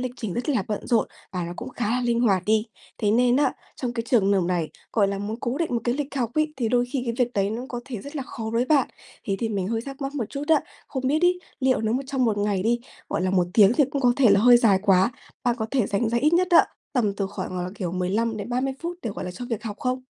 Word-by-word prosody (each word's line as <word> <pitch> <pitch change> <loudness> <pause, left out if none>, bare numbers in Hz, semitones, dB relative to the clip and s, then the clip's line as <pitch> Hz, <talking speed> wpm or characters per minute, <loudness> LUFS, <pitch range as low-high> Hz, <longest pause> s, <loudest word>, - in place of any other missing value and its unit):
lịch 250 -1 -3
trình 220 -6 -4
rất 245 +5 -3
là 250 -9 +2
bận 210 - -3
rộn 230 -3 +2 0.2
và 180 -2 -2
nó 170 - -5
cũng 245 +2 -6
khá 240 -4 -3
là 250 +2 +1
linh 235 -1 +1
hoạt 195 -6 +3
đi. 220 +1 +2 0.3
Thế 205 -2 +1
nên 245 +2 +4
á, 290 - +3 0.2
trong 245 -2 -3
cái 230 - -2
trường 205 -5 +3
hợp 195 -2 +3
này, 170 -3 0 0.2
gọi 205 -3 +3
là, 195 0 -2
muốn 210 +2 -4
cố 250 +3 -2
định 335 -1 -1
một 235 - +1
cái 240 - +1
lịch 285 0 -4
học 235 -3 0
ấy 310 0 +1
thì 235 -4 0
đôi 245 0 +3
khi 270 - -1
cái 235 - -2
việc 240 - -16
đấy 200 0 +1
nó 230 +3 -3
có 245 -1 -4
thể 245 -6 -6
rất 285 +6 -8
là 275 - -2
khó 230 -3 -7
với 235 +2 +2
bạn. 275 -1 +3 0.4
Thế 195 -1 -1
thì 230 - -1
mình 195 -3 -2
hơi 225 0 -1
thắc 275 0 -8
mắc 275 +1 -4
một 255 -6 -1
chút 280 +1 -5
á, 315 -3 +5 0.3
không 260 -1 -3
biết 305 +5 +1
ấy, 360 0 +3 0.2
liệu 260 -3 +2
nó 220 0 0
một 260 - 0
trong 265 -2 0
1 215 -3 +1
ngày 205 -2 0
đi, 235 +2 +1 0.3
gọi - - -1
là, 185 - +1
1 180 -2 +2
tiếng 205 -1 +7
thì 290 +3 +4
cũng 280 - -2
có 245 -1 +5
thể 250 -7 +5
là 200 - +5
hơi 245 +2 +8
dài 215 -5 +4
quá, 195 +2 +4 0.3
bạn 240 -1 +2
có 220 - -1
thể 255 -7 +1
dành 205 +3 0
ra 235 +1 +1
ít 300 +4 +2
nhất 360 +1 +3
á, 345 - +7 0.3
tầm 225 -7 +1
từ 200 - -1
khoảng 185 -2 -5
là, 180 0 -3
kiểu, 180 -5 -4
15-30 225 +7 -1
phút 345 +1 -4
để, 225 - -2
gọi - - -5
là, 180 - -4
cho 190 +7 -7
việc 230 -4 -4
học 210 -3 -5
không? 255 0 -2
235 Hz, 295 wpm, -24 LUFS, 205-255 Hz, 0.4 s, hơi